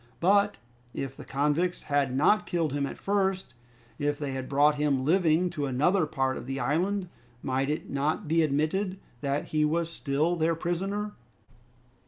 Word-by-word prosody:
But 200 +3 +3 0.4
if 135 - -4
the - - -10
convicts 150 +6 0
had 140 -3 0
not 210 +8 +3
killed 165 -5 0
him 140 -1 0
at - - -7
first, 190 -7 -1 0.5
if 145 0 0
they 145 -2 -3
had 130 -1 -5
brought 145 +2 +4
him 145 -3 0
living 175 +1 +3
to 145 -4 -2
another 155 +7 +2
part 135 -2 -1
of - - -8
the 135 0 -3
island, 180 +9 0 0.4
might 135 +1 0
it 150 - -2
not 145 +3 -1
be 165 +2 +3
admitted 155 +6 0 0.2
that 140 +1 -2
he 155 -1 +1
was 165 +2 0
still 155 +3 0
their 165 0 +1
prisoner? 195 +5 -2
155 Hz, 165 wpm, -28 LUFS, 140-180 Hz, 0.5 s, brought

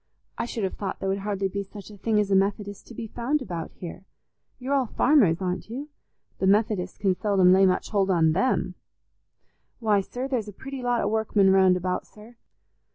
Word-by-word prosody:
I - - -2
should 230 -2 -4
have 190 - -1
thought 200 - -5
there 195 - -2
would 195 +1 0
hardly 195 -1 -1
be 200 +1 -3
such 200 +1 -10
a - - -11
thing 210 +2 0
as 205 -1 0
a - - +5
Methodist 200 +1 -1
to 235 - -11
be 225 - -5
found 245 +7 -1
about 175 - -5
here. 180 +2 -9 0.5
You're 265 +2 -3
all 270 -3 +2
farmers, 210 - +3
aren't 180 +3 -3
you? 275 +6 -6 0.5
The 190 - +1
Methodists 200 -2 +1
can 195 -2 +2
seldom 185 -1 +3
lay 190 +1 +5
much 185 - -1
hold 195 -2 +1
on 165 -4 +3
them." 195 +11 0 1.1
"Why, 215 -4 +2
sir, 250 +7 -5
there's 245 -6 -2
a 205 - -8
pretty 270 +5 -7
lot 245 -1 +1
o' - - 0
workmen 210 -2 +2
round 190 -1 +5
about, 180 0 -3
sir. 215 +3 -16
200 Hz, 205 wpm, -25 LUFS, 190-230 Hz, 1.1 s, a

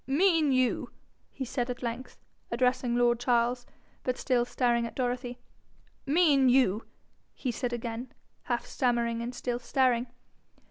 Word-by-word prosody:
'Mean 320 +1 +3
you 255 -1 +1 0.2
?' - - -42
he 265 - -5
said 245 0 -2
at 250 0 -5
length, 240 +2 -5 0.3
addressing 250 0 +1
lord 240 -1 +3
Charles, 245 0 +1 0.3
but 255 -1 -2
still 245 -2 +1
staring 240 -2 +1
at - - -11
Dorothy; 245 -1 -2 0.7
'Mean 285 -4 +4
you 245 -5 +3 0.2
?' - - -42
he 255 - +1
said 240 +1 -3
again, 235 +1 -5 0.3
half 240 -2 -1
stammering, 235 -2 0
and 240 +1 -5
still 245 -1 -2
staring. 250 -1 +1
245 Hz, 145 wpm, -29 LUFS, 240-260 Hz, 0.7 s, Mean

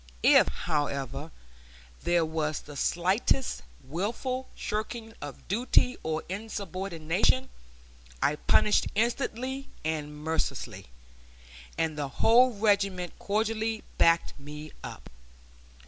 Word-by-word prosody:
If, - - +7
however, 140 -2 -2 0.7
there 175 -1 +3
was 155 -1 -1
the 145 - -11
slightest 190 - +1 0.2
willful 230 - -2
shirking 220 +1 -4
of 145 -3 -8
duty 245 +5 +3
or 160 0 -2
insubordination, 195 +2 -1 0.7
I 150 +1 +2
punished 210 - +4
instantly 255 +4 -1 0.2
and 150 -2 -2
mercilessly, 160 - -3 0.9
and 160 -2 0
the 145 - -1
whole 240 - +5
regiment 200 -4 +1
cordially 220 +1 0 0.2
backed 165 0 +4
me 150 +2 -8
up. - - -8
185 Hz, 95 wpm, -29 LUFS, 155-225 Hz, 0.9 s, If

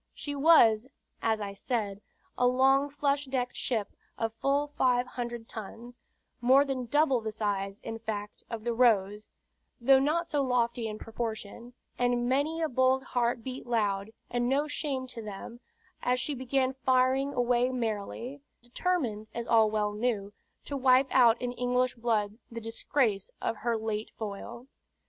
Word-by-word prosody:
She 290 - -5
was, 260 -7 +5 0.3
as 220 -1 +1
I 200 -1 -4
said, 205 -2 -3 0.3
a 250 - +3
long 270 +3 +4
flush 285 0 0
decked 260 -2 -2
ship 220 -5 -2 0.3
of 225 -1 -2
full 275 +5 +1
five 250 -1 +3
hundred 240 -2 -6
tons, 230 +3 -9 0.4
more 265 +3 +6
than 260 -3 -3
double 275 -2 +3
the 220 0 -3
size, 200 -2 -2
in 225 - -6
fact, 210 -2 -5
of 225 -2 -5
the 240 0 0
Rose, 210 -3 +2 0.5
though 265 +2 +6
not 310 +5 +1
so 295 -3 0
lofty 240 -3 0
in 215 -1 -5
proportion; 225 +1 -6 0.3
and 245 0 +1
many 295 +6 +1
a - - +2
bold 260 0 +2
heart 240 -2 -1
beat 255 0 -6
loud, 205 -4 0 0.2
and 245 0 -1
no, 285 +3 +2
shame 280 -3 -2
to 250 -2 -8
them, 215 +3 -8 0.4
as 250 0 +1
she 290 +4 -1
began 260 0 0
firing 265 +1 +2
away 245 0 +2
merrily,, 235 +2 -4 0.2
determined, 240 - -1
as 235 0 -3
all 225 -2 +4
well 210 -1 0
knew, 210 -2 -1 0.3
to 285 - -4
wipe 260 0 +4
out 240 -3 +5
in 245 -1 -2
English 250 +1 0
blood 220 -2 -1
the 230 - -6
disgrace 225 -2 -1
of 225 - -2
her 235 +1 0
late 220 0 -3
foil. 225 +3 -6
240 Hz, 160 wpm, -29 LUFS, 220-260 Hz, 0.5 s, more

